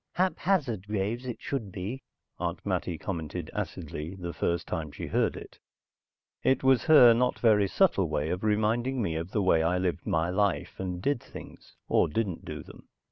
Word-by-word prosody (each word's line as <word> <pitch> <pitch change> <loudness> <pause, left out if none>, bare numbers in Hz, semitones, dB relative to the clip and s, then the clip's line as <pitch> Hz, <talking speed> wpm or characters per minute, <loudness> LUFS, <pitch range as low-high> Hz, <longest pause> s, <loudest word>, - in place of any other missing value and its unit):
"Haphazard 170 - 0
Graves, 105 +5 -2
it 120 - -5
should 115 -8 -4
be," 105 +8 -5 0.4
Aunt 85 0 -3
Mattie 90 -3 -1
commented 85 -2 -5
acidly 80 +5 -5
the 90 -2 -6
first 85 +2 -1
time 80 -4 -4
she - - -6
heard - - +1
it. - - -11 0.8
It 130 0 +2
was 130 -2 +4
her 135 -7 +8
not 125 +2 +1
very 105 -4 +4
subtle 95 - +2
way 75 +1 -1
of 90 +3 -3
reminding 110 +5 +1
me 80 -5 -1
of 80 +2 -3
the 105 +1 0
way 80 -3 +4
I 85 +3 +1
lived 90 -1 -2
my 80 +2 +1
life 100 0 0
and 90 -1 -4
did 140 -4 +1
things, - - -12
or - - +3
didn't 95 +1 -2
do - - -6
them. - - -15
95 Hz, 180 wpm, -28 LUFS, 85-120 Hz, 0.8 s, her